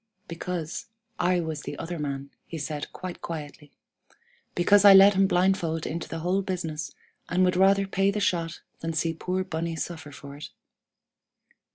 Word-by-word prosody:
"'Because 170 +4 -4 0.3
I 180 0 +2
was 160 -3 -4
the - - -6
other 170 0 -5
man,' 140 -1 -4 0.2
he 165 - -6
said 150 -1 -4
quite 185 -1 -7
quietly; 150 -2 -7 0.8
'because 200 +3 +5
I 200 -1 +10
led 195 +1 +9
him 195 0 +4
blindfold 175 -3 +1
into 170 +1 -4
the 165 - -5
whole 185 +4 +1
business, 165 -6 -4 0.3
and 185 +2 +3
would 180 - +2
rather 195 +1 +4
pay 195 0 +1
the 205 +1 -1
shot 170 -5 -1 0.2
than 165 0 -3
see 165 +1 0
poor 185 +3 -2
Bunny 165 -2 -3
suffer 160 -2 -5
for 140 0 -10
it.' 150 - -8
170 Hz, 165 wpm, -27 LUFS, 160-185 Hz, 0.8 s, I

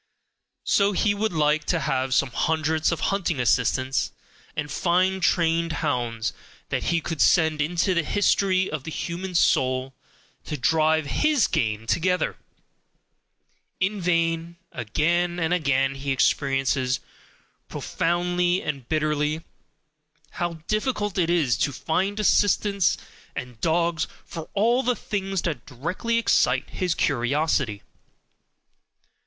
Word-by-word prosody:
So 200 0 +3
he 205 +2 +2
would 215 +1 -1
like 155 -1 +1
to 170 - +1
have 130 0 0
some 135 -1 +2
hundreds 160 +4 +1
of 170 - -2
hunting 175 -7 -1
assistants, 130 +2 +1 0.4
and 150 -1 -3
fine 185 +4 +1
trained 165 -1 +1
hounds, 120 -5 -1 0.4
that - - -2
he 170 -1 +1
could 160 -1 -3
send 160 -3 +4
into 175 +5 +1
the 170 - +2
history 190 +1 +2
of 150 -3 -4
the 160 - -6
human 175 +3 -5
soul, 130 -4 +2 0.5
to 150 - -4
drive 155 +4 +2
HIS 300 - +2
game 110 -1 -1
together. 180 +8 0 1.4
In 195 +2 0
vain: 170 -1 0 0.2
again 170 +9 0
and 165 +1 +1
again 135 -5 +1
he 135 0 -4
experiences, 135 -1 +1 0.7
profoundly 175 +1 0
and 140 -5 -5
bitterly, 155 0 0 0.9
how 175 -1 -2
difficult 215 -3 -1
it 170 -2 +2
is 160 -9 +2
to 145 - +1
find 190 +9 -1
assistants 205 -2 +2 0.4
and 125 -3 -7
dogs 170 0 +1 0.2
for 165 -1 -8
all 235 +5 +3
the 250 -1 +1
things 195 -4 -3
that 165 -4 -3
directly 170 - -2
excite 230 - +2
his 180 -3 -1
curiosity. 140 -4 0
165 Hz, 120 wpm, -24 LUFS, 140-180 Hz, 1.4 s, send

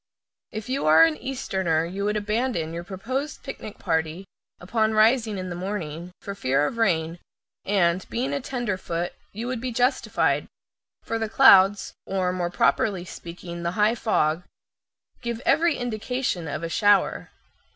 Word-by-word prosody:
If 215 -1 -6
you 260 - -1
are 160 +1 +8
an 165 -1 +4
Easterner 190 -11 -1
you 195 +4 -4
would 210 +1 0
abandon 210 -6 -1
your 170 +1 -5
proposed 255 - -4
picnic 215 -6 -8
party, 160 +3 -1 0.3
upon 220 +4 0
rising 220 -1 +3
in 185 -1 -5
the - - -4
morning, 175 -3 -5
for 200 - -5
fear 145 -6 +1
of 230 - -4
rain, 170 -5 +1 0.5
and, 185 -2 +2
being 260 +4 -2
a 280 - -1
tenderfoot, 190 -9 -3 0.2
you 220 +4 -5
would 250 -2 -3
be 255 0 -3
justified, 250 +3 +1 0.6
for 225 - -2
the 220 -1 -2
clouds 200 -5 +6
or, 185 -1 0
more 175 -1 -1
properly 180 +3 +1
speaking, 170 0 -8
the 170 0 -2
high 210 +2 +4
fog 165 -9 +1 0.8
give 235 -1 -3
every 335 -1 +3
indication 245 -6 -2
of 150 +2 -4
a - - -1
shower. 205 +4 +2
200 Hz, 150 wpm, -25 LUFS, 170-230 Hz, 0.8 s, are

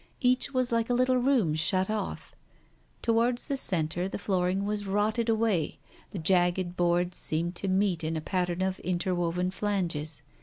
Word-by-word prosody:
Each 255 +1 +1
was 255 -2 0
like 230 0 +1
a 245 - +2
little 255 +1 +3
room 245 - +2
shut 185 +4 +1
off. 215 -1 -4 0.7
Towards 235 +2 +1
the 280 - -2
centre 175 - +2
the - - -4
floor 185 -3 0
ing 195 +2 -1
was 205 -1 -2
rotted 215 +4 0
away 220 -8 +1 0.2
— - - -26
the - - -7
jagged 175 +1 +2
boards 175 0 +1
seemed 170 +3 0
to 195 - -3
meet 190 -3 +1
in 160 +1 -1
a - - -1
pattern 180 +1 -1
of 190 0 -2
interwoven 180 0 -1
flanges. 175 -7 -2
190 Hz, 175 wpm, -28 LUFS, 175-220 Hz, 0.7 s, little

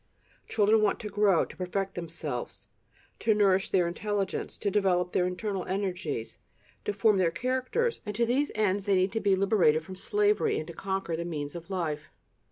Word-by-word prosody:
Children 215 +1 +3
want 210 -2 +2
to 210 - -5
grow, 200 -4 +3
to - - -13
perfect 190 +2 -2
themselves, 160 -7 -5 0.5
to 220 -1 +2
nourish 195 -1 +3
their 180 -3 +3
intelligence, 195 +2 -2
to 200 - -1
develop 180 -3 +2
their 180 - +2
internal 190 +1 -3
energies, 180 - -3 0.5
to - - +1
form 205 0 +3
their 180 -3 +3
characters 260 - -1
and 210 -2 -5
to 235 +2 +2
these 270 +5 +1
ends 205 -2 +1
they 200 - +4
need 185 +1 +2
to 225 - -1
be 200 -3 +3
liberated 190 -6 +3
from 185 - -8
slavery, 415 - +1
and 155 - -3
to 170 - -9
conquer 190 -1 -2
"the 170 - -3
means 150 -4 -4
of 170 +1 -9
life." 155 -5 -3
195 Hz, 180 wpm, -29 LUFS, 175-210 Hz, 0.5 s, they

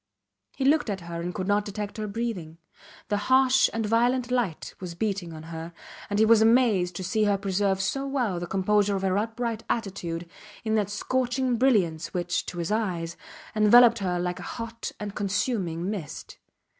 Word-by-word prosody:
He 265 - -2
looked 295 -3 +3
at 195 -2 -3
her 170 0 -6
and 175 +1 -3
could 185 +1 -4
not 205 0 +2
detect 205 +1 -5
her 215 -1 -3
breathing. 200 -7 -4 0.5
The 205 - +1
harsh 260 0 +5
and 225 -1 -2
violent 240 +3 +2
light 235 -10 -1
was 180 -2 -6
beating 195 -3 -2
on 155 -1 -9
her, 165 +1 -6 0.4
and 205 - -1
he 220 - +5
was 225 0 +6
amazed 220 -7 +3
to 185 - -4
see 210 +4 +1
her 205 -1 +2
preserve 195 0 0
so 270 +8 -1
well 245 -10 -1
the 175 - -5
composure 200 +2 +2
of 195 - -3
her 190 -1 +1
upright 225 +1 -3
attitude 180 -6 -3 0.4
in 220 -1 -1
that 210 -2 +1
scorching 255 +3 0
brilliance 195 -11 +1
which, 175 0 -1
to 175 - -6
his 170 +2 -2
eyes, 175 -6 -1 0.4
enveloped 235 +2 +7
her 180 -3 -1
like 180 0 -2
a - - -6
hot 230 0 -5
and 205 -1 -5
consuming 195 -4 -1
mist. 195 -8 -6
205 Hz, 180 wpm, -26 LUFS, 180-230 Hz, 0.5 s, enveloped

